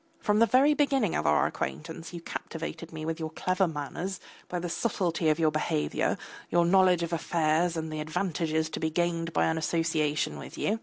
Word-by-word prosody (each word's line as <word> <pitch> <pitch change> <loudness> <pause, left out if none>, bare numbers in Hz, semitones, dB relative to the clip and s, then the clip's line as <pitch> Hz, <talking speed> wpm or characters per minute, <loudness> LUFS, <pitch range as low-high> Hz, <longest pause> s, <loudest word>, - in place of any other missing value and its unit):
From 210 0 +2
the 230 - +6
very 275 +5 +5
beginning 275 - +2
of - - 0
our 75 - +4
acquaintance 75 - -4
you 170 -1 -7
captivated 165 0 -6
me 155 -1 -6
by 165 - 0
your 160 -1 -3
clever 185 +3 +1
manners, 165 +5 -4 0.3
by 180 - -2
the 175 0 -3
subtlety 175 -4 0
of 155 - +3
your 160 -2 +3
behaviour, 75 - 0 0.3
your 175 0 +3
knowledge 180 -1 +4
of 170 0 -3
affairs 165 +1 +1
and 160 -1 -3
the 155 - -3
advantages 160 0 -1
to - - -4
be 160 - 0
gained 170 0 0
by - - +2
association 160 -2 0
with - - -9
you. 220 +2 0
165 Hz, 190 wpm, -28 LUFS, 155-180 Hz, 0.3 s, the